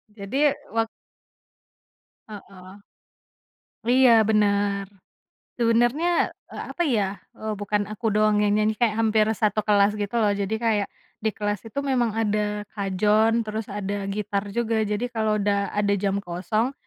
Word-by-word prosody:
Jadi 270 +8 +1 0.2
wak 225 0 +1 1.4
Heeh. 195 -1 -12 1.1
Iya 255 +1 +5 0.2
bener. 200 -1 +2 0.7
Sebenarnya 240 +9 +2 0.2
eee, - - -7
apa 345 - -3
ya, 200 -1 -1 0.2
eee, 215 0 -3
bukan 205 0 -1
aku 215 0 -7
doang 210 0 +3
yang 205 -1 +2
nyanyi 215 +1 +2
kayak 215 -1 0
hampir 220 -1 +3
1 215 0 +1
kelas 205 0 +4
gitu 205 +2 -4
loh 210 -3 +3
jadi 200 +1 -2
kayak, 210 -3 +1 0.3
di 220 - +1
kelas 205 -2 -2
itu 280 - -3
memang 245 -4 +1
ada 210 -1 -1
kajon 215 +3 +2
terus 215 0 -5
ada 200 0 -3
gitar 200 0 -2
juga 225 0 0
jadi 210 +2 -1
kalau 220 -2 +1
udah 200 -1 0
ada 205 -1 +2
jam 200 0 0
kosong, 200 +7 -2
210 Hz, 140 wpm, -24 LUFS, 200-225 Hz, 1.4 s, Iya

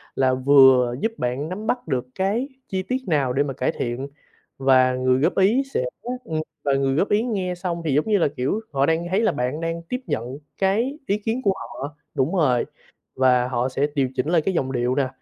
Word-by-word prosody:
là 130 -1 +2
vừa 130 -2 +5
giúp 225 - +1
bạn 130 +6 -2
nắm 210 +4 -5
bắt 245 -6 -1
được 130 -3 -1
cái 205 +8 0 0.2
chi 190 -1 -2
tiết 255 +7 -1
nào 140 -6 +1
để 140 +2 +2
mà 140 - -4
cải 130 0 0
thiện 125 +3 -4 0.5
và 130 -1 +4
người 130 0 +2
góp 165 +6 +1
ý 215 +8 +4
sẽ - - +1 0.4
ừm, 160 -8 -2 0.2
và 140 -1 +2
người 135 0 +1
góp 190 - +1
ý 205 +1 +3
nghe 190 -7 -2
xong 175 -1 -3
thì 145 - +1
giống 150 - +2
như 210 - +3
là, 170 - +3
kiểu, 135 +12 0
họ 135 0 +2
đang 165 +2 0
thấy 195 +4 +1
là - - +3
bạn 135 +4 -2
đang 165 0 -2
tiếp 250 +1 -2
nhận 125 +5 -3 0.2
cái 225 +9 +1
ý 200 - +1
kiến 225 +4 -2
của 195 - +3
họ 145 -5 -7 0.2
đúng 150 +7 0
rồi, 130 -8 +2 0.5
và 125 -1 +3
họ 125 0 -1
sẽ 140 +3 0
điều 135 -2 +1
chỉnh 135 +3 -1
lại 170 -1 +3
cái 190 - -1
giọng 130 -6 -1
điệu 125 0 0
nè, 135 -2 +1
145 Hz, 225 wpm, -23 LUFS, 130-190 Hz, 0.5 s, vừa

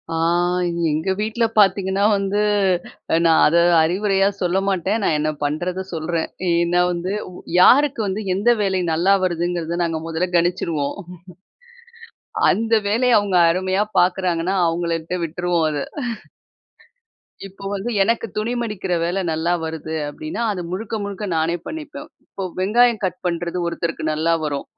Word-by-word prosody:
அ - - -1 0.7
எங்க 160 +5 -1
வீட்ல 220 +2 0
பார்த்தீங்கன்னா 195 0 +3
வந்து 200 +1 -1 0.8
நா 165 - +4 0.2
அத 155 - +1 0.3
அறிவுரையா 195 +3 +1
சொல்ல 180 +1 +1
மாட்டேன். 195 +3 0
நான் 165 - +2
என்ன 155 +1 0
பண்ணறத 175 +6 -2
சொல்றேன். 165 0 -2 0.2
ஏன்னா 170 +1 +2
வந்து 175 +2 -3 0.5
யாருக்கு 280 +5 +5
வந்து 195 +3 -2
எந்த 205 +6 +1
வேலை 190 -2 +1
நல்லா 175 +5 +3
வருதுங்கிறத 170 -1 -1
நாங்க 165 -1 -1
முதல்ல 165 +2 -1
கணிச்சுறுவோம். 170 -4 0 1.5
அந்த 225 +1 0
வேலைய 235 +3 +3
அவுங்க 200 -3 0
அருமையா 185 +3 0 0.2
பாக்குறாங்கன்னா 180 0 +1
அவங்களட்ட 165 +1 -2
விட்டுருவோம் 170 0 -1
அத. 145 -2 -2 1.7
இப்போ 195 +1 -14
வந்து 200 +5 -3
எனக்கு 230 +3 0
துணி 220 +3 -1
மடிக்கிற 205 -5 -4
வேல 175 +3 -1
நல்லா 160 +2 0
வருது 160 0 -5
அப்படின்னா 155 +10 -5
அத 185 - -5
முழுக்க 215 +4 -4
முழுக்க 200 +1 -5
நானே 165 +2 0
பண்ணிப்பேன். 305 -1 -7 0.2
இப்ப 190 -2 -6
வெங்காயம் 230 +3 +3
கட் 180 0 -5
பண்றது 175 +1 -2
ஒருத்தருக்கு 170 -1 -3
நல்லா 165 +2 +1
வரும். 145 -2 -3
180 Hz, 130 wpm, -21 LUFS, 165-200 Hz, 1.7 s, யாருக்கு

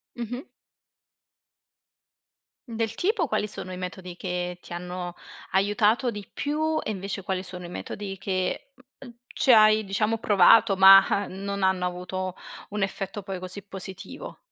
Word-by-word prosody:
Mh-mh. 245 +2 -5 2.2
Del 225 -1 -3
tipo, 375 - +1
quali 210 -3 -1
sono 185 -2 -7
i - - -6
metodi 180 -1 -7
che 180 -1 -4
ti - - -15
hanno, 180 0 -5 0.4
aiutato 210 +5 +2
di 205 -2 -7
più, 310 +2 -1
e 215 - -3
invece 195 0 -4
quali 185 0 -3
sono 180 -1 -8
i - - -8
metodi 195 +1 -6
che 190 +5 -2 0.3
uhm, 245 -3 -11
ci 260 - +2
hai 215 -1 +6
diciamo 215 +3 0
provato, 205 0 +5
mah, 195 +1 +7
non 200 +1 -5
hanno 190 -1 +2
avuto 180 +1 -4 0.3
un 205 0 -4
effetto 195 +1 -3
poi 195 -1 -6
così 185 +2 -6
positivo? 190 -1 -8
195 Hz, 140 wpm, -26 LUFS, 185-215 Hz, 2.2 s, mah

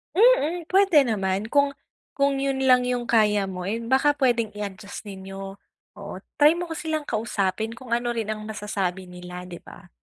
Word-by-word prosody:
Mm, 365 -6 +4
pwede 380 -6 +5
naman 200 -2 -1
kung 280 -1 +3 0.4
kung 280 -1 +2
yun 270 -1 0
lang 255 -1 +6
yung 245 -1 -1
kaya 210 -3 +3
mo, 185 -1 -6
eh. 215 +3 -1
Baka 265 +5 +2
pwedeng 240 -5 +2
i-adjust 200 0 -7
ninyo 195 0 -8 0.4
oo. 200 0 -8 0.3
Try 300 +2 +7
mo 350 -1 -4
silang 310 -2 -2
kausapin 215 0 -1
kung 255 -1 -12
ano 240 0 0
rin 225 -2 -3
ang 215 0 -5
masasabi 195 -3 -3
nila, 180 0 -8
'di 175 - -7
ba? 175 -1 -14
225 Hz, 170 wpm, -25 LUFS, 195-275 Hz, 0.4 s, Try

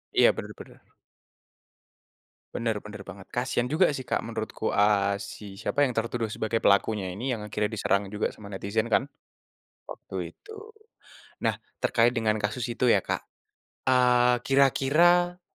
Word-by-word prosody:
Iya, - - +7
bener - - -6
bener. - - -14 1.7
Bener 115 -3 -1
bener 105 -1 -10
banget, 95 0 -11
kasihan 125 0 -1
juga 160 +4 +3
sih, 130 -3 -6
Kak, - - 0
menurutku, 110 -1 -3
a 100 -1 +2
si 100 0 -9
siapa 145 +5 +1
yang 130 - +2
tertuduh 115 -1 -2
sebagai 110 +1 -2
pelakunya 100 -1 +2
ini, 120 +7 -2
yang 105 - -7
akhirnya 105 0 -1
diserang 100 -1 +1
juga 105 +2 -2
sama 105 - -12
netizen 100 +3 -2
kan, 120 - +3 0.8
waktu - - -7
itu. 435 +1 -13 0.8
Nah, - - 0 0.2
terkait 120 +1 +3
dengan 110 -3 +1
kasus 110 +4 -2
itu 120 +2 -2
ya, 100 - +4
Kak, - - -3 0.6
eee, 125 -1 +4
kira-kira 170 +7 +3
115 Hz, 145 wpm, -27 LUFS, 105-125 Hz, 1.7 s, Iya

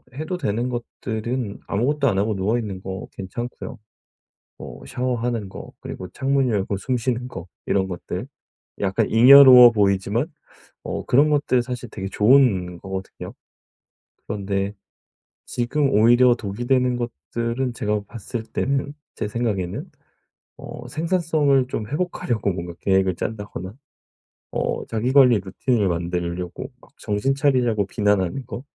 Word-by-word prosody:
해도 155 +5 -3
되는 120 -5 -1
것들은 120 -1 -4
아무것도 140 +7 +1
안 100 - +1
하고 105 +3 +1
누워있는 100 0 -2
거 95 -1 -6
괜찮고요. 120 +6 -7 0.8
어 - - -9
샤워하는 120 -4 -2
거, - - -10
그리고 90 - -7
창문 135 +2 0
열고 100 -2 -1
숨 125 +6 -1
쉬는 125 0 -2
거, 85 -8 -8 0.2
이런 95 -1 +1
것들 90 -2 -5 0.5
약간 95 -1 +1
잉여로워 125 +1 +9
보이지만 100 - +1 0.5
어 - - -4
그런 145 +5 +4
것들 145 -4 +2
사실 125 0 -6
되게 95 -3 -5
좋은 105 -6 +3
거거든요. 95 +1 -7 1.0
그런데 100 -1 -2 0.7
지금 135 +4 0
오히려 120 +2 +5
독이 110 0 -5
되는 125 -1 +2
것들은 120 - -3
제가 105 -2 -1
봤을 115 +2 -6
때는 140 +4 -2 0.2
제 105 - -3
생각에는 105 -6 -3 0.7
어 - - -9
생산성을 155 -5 +1
좀 110 -4 -4
회복하려고 140 - -1
뭔가 85 -1 -6
계획을 95 -2 +2
짠다거나 105 -3 -5 0.8
어 - - -2
자기 115 +3 -1
관리 125 -6 +6
루틴을 100 +3 0
만들려고 85 +1 -3
막 - - -20
정신 105 +7 -1
차리라고 125 -7 +2
비난하는 105 +5 0
거 115 +1 -7
115 Hz, 290 characters per minute, -22 LUFS, 100-130 Hz, 1.0 s, 잉여로워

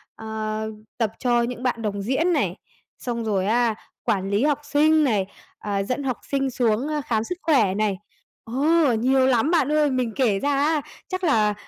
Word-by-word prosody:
ờ, 220 0 -4 0.3
tập 225 -3 0
cho 240 -1 +2
những 245 +1 -4
bạn 240 -2 -1
đồng 205 -2 -2
diễn 290 - +1
này, - - 0 0.4
xong 235 -2 -3
rồi 195 -3 0
á, 230 0 +2 0.3
quản 195 -1 0
lý 205 +5 +1
học 295 -1 +2
sinh 305 +2 +3
này, 210 -8 +1 0.3
à, 200 -1 -2
dẫn 255 +7 -3
học 255 -3 -1
sinh 270 -1 +1
xuống 235 +2 +1 0.2
khám 220 -2 0
sức 360 +8 -5
khỏe 235 - +3
này. 210 -3 0 0.5
Ờ, 285 +3 +2
nhiều 260 +3 +3
lắm 260 +5 +2
bạn 300 -4 +2
ơi, 300 -2 +3
mình 250 -4 -1
kể 225 -8 +2
ra 285 - -1
á, 300 +1 +2 0.3
chắc 370 0 -4
là 215 -9 +3
245 Hz, 185 wpm, -23 LUFS, 215-285 Hz, 0.5 s, sinh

